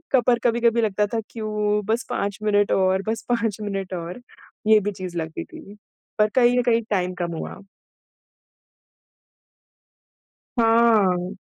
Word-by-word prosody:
क 245 - +4
पर 240 -1 +4
कभी-कभी 235 -1 +2
लगता 210 -1 +1
था, 230 +1 -2
"क्यूँ? 210 -2 -1
बस 230 +4 -1
5 200 -4 -2
मिनट 205 -1 +2
और 190 0 +2
बस 225 - -2
5 230 -4 0
मिनट 195 -2 -4
और।" 175 +7 -6 0.5
ये 220 -1 +7
भी 205 +1 -2
चीज़ 185 -3 -7
लगती 160 -1 -4
थी। 205 +1 -13 0.4
पर 210 0 +4
कहीं 245 -1 +4
न - - +1
कहीं 230 -1 +2
टाइम 180 -2 0
कम 170 -1 -3
हुआ। - - -7 3.0
हाँ। 215 -5 +3
210 Hz, 140 wpm, -23 LUFS, 190-230 Hz, 3.0 s, ये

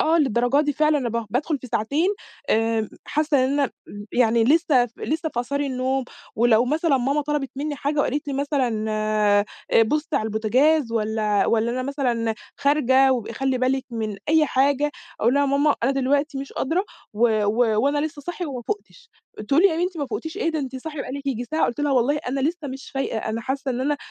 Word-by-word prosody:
آه، 325 +2 +3
للدرجة 255 -1 +2
دي 295 -1 0
فعلًا. 305 +1 +2
أنا 250 -4 -2
ب 230 0 -3
بادخل 290 +6 -1
في 255 - -10
ساعتين، 280 - 0 0.4
آآ، 225 -1 +1 0.2
حاسة 295 -3 +1
إن 260 - 0
أنا 280 -3 +1 0.2
إمم، 205 +1 -9
يعني 230 -2 +3
لسه 285 -2 +4
ف 230 - -21
لسه 315 +1 -2
في 240 - -2
آثار 280 +4 -3
النوم 265 -1 -1 0.3
ولو 235 0 +4
مثلًا 305 +2 +1
ماما 275 +4 +1
طلبت 290 -2 -2
مني 290 +1 -3
حاجة 290 +2 -2
وقالت 290 +1 -1
لي 275 - -2
مثلًا، 265 -6 0
آآ 215 -1 +2 0.4
بُصي 300 +7 0
على - - 0
البوتجاز 230 +5 +2
والّا 215 -2 +1
والّا 230 +1 +1
أنا 255 +1 -2
مثلًا 245 -5 -1 0.2
خارجة 270 -2 +4
وابْقي 235 -3 -3
خلّي 265 +2 -1
بالِك 260 +1 0
من 220 -3 -3
أي 315 0 +4
حاجة 280 +2 +2 0.3
أقول 235 +4 +3
لها: 285 - +3
"يا - - +2
ماما 280 +2 +3
أنا 250 - +3
دلوقتي 275 +2 0
مش 275 0 -7
قادرة 335 +8 0 0.3
و 220 0 +2
و 220 +1 +2
وأنا 285 +1 +2
لسه 295 -1 -10
صاحية 350 +3 -4
وما 260 -4 -5
فوقتش" 455 - -6 0.4
تقول 290 +5 +4
لي: 395 - +7
"يا 320 - -2
بنتي 355 0 -2
ما 285 - -2
فوقتيش 320 +7 -5
إيه، 330 -6 -1
أنتِ 265 -2 -4
صاحية 300 +2 -6
بقى 255 - -5
لِك 280 0 -6
ييجي 245 -3 -1
ساعة." 315 +5 0
قلت 240 - -4
لها: 290 -1 +1
"والله 260 +3 +2
أنا 270 +2 -1
لسه 310 +1 -2
مش 270 +1 -8
فايقة، 270 -4 -2
أنا 220 +1 -3
حاسة 265 +2 -3
إن 250 - -2
أنا 290 +3 0
270 Hz, 210 wpm, -23 LUFS, 235-295 Hz, 0.4 s, لي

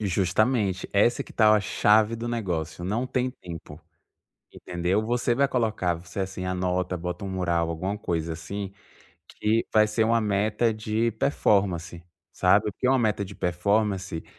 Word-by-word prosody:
E 105 - -1
justamente 95 +2 +1
essa 105 +4 +3
que - - -14
tal 110 -1 +5
a 105 - +3
chave 105 +2 +3
do 115 +1 -4
negócio, 85 -8 -3
não 110 +7 -1
tem 130 0 -1
tempo 85 - -10 0.7
Entendeu 90 +4 -1
Você 120 0 +1
vai 140 +2 +3
colocar 110 -9 0
você 90 +3 -9
assim 95 -1 -4
anota, 90 0 -1
bota 90 +2 -5
um - - -4
mural, 85 -3 0
alguma 95 +5 -3
coisa, 85 -4 -2
assim, 95 +4 -6 0.6
que 110 +2 0
vai 110 0 +5
ser 110 +1 +1
uma 115 +1 +3
meta 105 +2 +1
de 110 +2 0
performance 95 - 0 0.3
Sabe, - - +3
porque 125 - -1
uma 135 0 +4
meta 105 -4 +1
de - - -10
performance, 95 0 -1
100 Hz, 160 wpm, -26 LUFS, 90-110 Hz, 0.7 s, tal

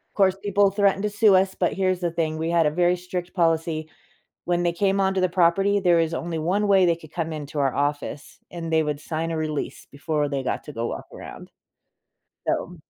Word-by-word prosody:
Course, 195 -1 +3
people 200 -1 +3
threatened 200 -1 +2
to 210 - +1
sue 205 -1 +4
us, 190 0 +2
but 175 - +1
here's 185 -1 0
the 175 -1 -1
thing, 160 -1 -2
we 160 +1 -2
had 170 -1 +3
a 150 - +2
very 175 +2 +2
strict 180 0 -6
policy. 165 -2 0 0.6
When 175 0 +1
they 175 -1 +1
came 195 +2 +1
onto 190 0 +1
the 185 - +3
property, 190 +3 +3
there 175 -3 +3
is 165 0 0
only 170 0 -3
one 190 +6 0
way 195 -2 +5
they 170 -1 +3
could 155 -2 -15
come 165 -2 -3
into 150 -1 -7
our 135 -2 +1
office, 145 0 -3
and 165 -2 -5
they 160 0 +3
would 150 -1 -2
sign 165 +1 -3
a 160 - -2
release 155 -2 -4
before 145 +1 -1
they 140 -2 -2
got - - -2
to 150 - -9
go 115 +1 -3
walk - - -5
around. - - -10 1.0
So 180 - -2
170 Hz, 220 wpm, -24 LUFS, 155-190 Hz, 1.0 s, way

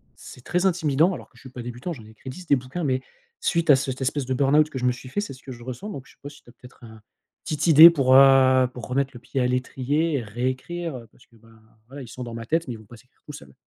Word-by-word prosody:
c'est 125 - -13
très 180 +2 -1
intimidant 165 -1 +2
alors - - -10
que - - -25
je - - -17
suis 130 - -12
pas 125 -1 -9
débutant. 120 +8 -6
J'en 115 -7 -12
ai - - -15
écrit 120 +4 -11
10 180 +7 -10
des 140 - +4
bouquins, 130 +7 -6
mais 130 -2 0 0.4
suite 170 -2 -1
à - - +8
cette 130 0 -4
espèce 135 +1 -1
de 130 - -2
burn-out 145 +3 +3
que 135 - -7
je - - -7
me 125 - +3
suis 125 +1 -9
fait, 205 - -2
c'est 205 - -6
ce 130 - -16
que 135 - -9
je 120 -1 -13
ressens 130 - -7
donc 140 -11 -7
je - - -18
sais - - -35
pas 145 - -8
si 145 - -17
tu - - -19
as - - -17
peut-être 125 -1 -18
un 110 -1 -13 0.4
petite 155 - -2
idée 160 +1 +10
pour, 135 -6 +2
heu, 130 -1 +6
pour 125 - -9
remettre 135 +1 -1
le 120 - -11
pied 135 - -4
à 125 - +2
l'étrier 135 +5 -1
et - - -6
réécrire, 130 +8 -4
heu, 115 -2 -12
parce - - -23
que 115 - -24
ben 115 +1 -22 0.4
voilà, 140 +2 -10
ils 120 - -11
sont 125 +1 -8
dans 115 -1 -7
ma 115 0 -7
tête 165 +3 -1
mais 120 - -4
ils - - -10
vont 110 - -16
pas 120 +3 -14
s'écrire 125 +4 -25
tout 150 - -10
seul. 70 - -13
130 Hz, 305 wpm, -24 LUFS, 125-150 Hz, 0.4 s, idée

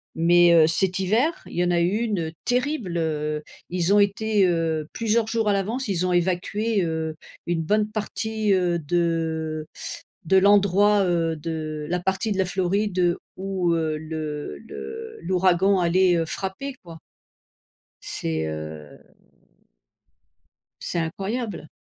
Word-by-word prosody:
Mais, 175 +1 +5
heu, 160 -2 +6
cet 185 +3 +3
hiver, 225 - +2 0.2
il - - -11
y 175 - +3
en 175 - +1
a 170 - +2
eu 190 +6 +1
une 190 -9 -1
terrible, 245 - -1
heu, 150 -2 -2 0.3
ils 180 +2 +1
ont 205 - +6
été, 205 0 +2
heu, 165 -3 0
plusieurs 225 0 +1
jours 225 -1 0
à - - +3
l'avance 220 +6 -1
ils 185 -2 0
ont - - 0
évacué, 190 +4 0
heu, 160 -1 -2 0.3
une 170 -1 0
bonne 210 +5 +1
partie, 220 0 -2
heu, 175 -2 +1
de 160 -1 -1 0.6
de 190 +4 +4
l'endroit, 200 +1 +5
heu, 165 -2 +1
de 155 -1 -4
la 180 +1 0
partie 190 +4 -1
de - - -5
la 190 - +3
Floride 185 -1 +1 0.2
où, 190 -2 -1
heu, 160 -2 0
le 155 -1 -5
le 450 +1 -8
l'ouragan 185 +1 +3
allait, 180 0 +3
heu, 165 - 0
frapper, 195 - -5
quoi. 165 -2 -10 1.1
C'est, 80 -1 -3
heu, 75 -1 -7 1.8
c'est 170 - -1
incroyable. 195 +2 -4
180 Hz, 140 wpm, -24 LUFS, 165-205 Hz, 1.8 s, heu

